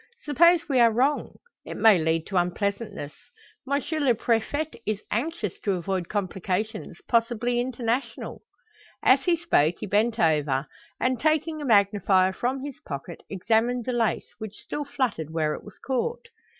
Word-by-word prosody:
Suppose 335 +3 +4
we 270 -4 +2
are 235 -1 +7
wrong? 260 +6 0 0.3
It - - -7
may 220 -5 +6
lead 160 0 0
to 195 - -7
unpleasantness. 200 -2 -2 0.6
M. 280 -1 +1 0.2
le 265 -5 +3
Prefet 235 +5 -1
is 215 -1 -2
anxious 235 - -2
to 200 - 0
avoid 185 -1 -2
complications 200 0 -3
possibly 240 +1 +1
international." 240 -1 -3 0.6
As 270 +1 +5
he 345 -2 +3
spoke, 175 - +2
he - - -5
bent 215 +3 +1
over, 150 - +2 0.3
and, 255 -1 +1
taking 310 +1 +1
a - - -4
magnifier 200 -4 +3
from 260 +6 -2
his 285 -2 -7
pocket, 145 +4 -7
examined 225 +5 +1
the 255 - -1
lace, 230 -3 -1
which 215 -2 -7
still 295 - -5
fluttered 240 - -2
where 155 -1 0
it - - -7
was 205 - -13
caught. 465 - -3
225 Hz, 150 wpm, -26 LUFS, 190-260 Hz, 0.6 s, are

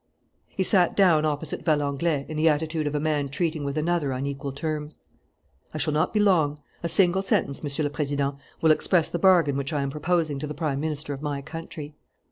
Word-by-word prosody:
He 190 - -2
sat 180 -2 +3
down 170 -6 +4
opposite 150 +1 -2
Valenglay, 145 -1 0
in 155 - -6
the 155 +1 +4
attitude 155 0 -1
of 145 - -2
a - - +1
man 150 -2 0
treating 160 +1 -2
with 140 +1 -3
another 155 -3 0
on 130 +2 -3
equal 140 0 -4
terms. 150 +1 -4 0.8
"I - - -1
shall 155 0 0
not 155 +1 +1
be 215 - +1
long. 160 -8 +3 0.2
A 170 - -2
single 180 +2 +3
sentence, 140 -7 0
Monsieur 145 +1 -2
le 145 - -1
President, 145 -2 -1 0.3
will 160 - +5
express 165 +1 +2
the 170 - -3
bargain 165 -7 +4
which 140 +3 -2
I 145 -2 0
am 135 - -2
proposing 155 -1 0
to 150 - -4
the 150 - -6
Prime 150 -3 -2
Minister 150 -1 -3
of 135 - -7
my 145 -2 -3
country." 155 -1 -8
150 Hz, 210 wpm, -25 LUFS, 145-165 Hz, 0.8 s, will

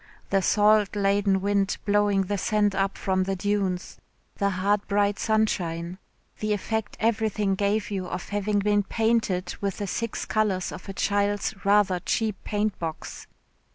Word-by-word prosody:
The 195 - +3
salt 210 +1 +3
laden 200 -1 +2
wind 200 0 +1
blowing 205 -1 +3
the 200 +1 -2
sand 210 0 +1
up 195 0 -1
from 185 -1 0
the 195 0 -1
dunes, 195 -2 -2 0.4
the 200 - +1
hard 200 +2 0
bright 205 0 +1
sunshine, 180 -5 0 0.4
the 215 0 0
effect 220 +2 -3
everything 220 -3 +1
gave 205 +2 0
you 190 -2 -3
of 180 0 -5
having 205 0 0
been 205 0 +2
painted 210 -4 0
with 200 -2 -2
the 205 - -3
six 230 +3 -3
colours 205 -4 0
of - - -9
a - - -4
child's 205 +2 0
rather 200 -2 +3
cheap 215 +3 -1
paint 210 -1 -1
box. 160 -2 -6
205 Hz, 155 wpm, -26 LUFS, 190-210 Hz, 0.4 s, The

